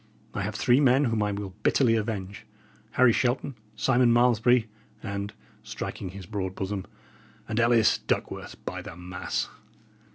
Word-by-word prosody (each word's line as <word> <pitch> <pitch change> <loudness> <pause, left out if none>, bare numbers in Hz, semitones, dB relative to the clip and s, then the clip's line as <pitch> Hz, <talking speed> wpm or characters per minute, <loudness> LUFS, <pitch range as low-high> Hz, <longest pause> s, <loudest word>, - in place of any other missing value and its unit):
I - - -2
have - - -3
three 125 +2 +4
men 135 0 +4
whom 115 -3 0
I 105 0 +1
will 100 -2 -5
bitterly 125 -5 +3
avenge 105 -3 -4 0.5
Harry 125 -2 +5
Shelton, 125 +3 0 0.2
Simon 125 +1 +3
Malmesbury, 120 0 +4 0.4
and" 100 -1 -4 0.3
striking 95 - -5
his 95 0 -9
broad 95 -1 -4
bosom 95 0 -3 0.6
"and 110 +1 -1
Ellis 115 -2 +4
Duckworth, - - -3
by - - -4
the - - -9
mass!" 90 0 -3
110 Hz, 140 wpm, -27 LUFS, 100-120 Hz, 0.6 s, Harry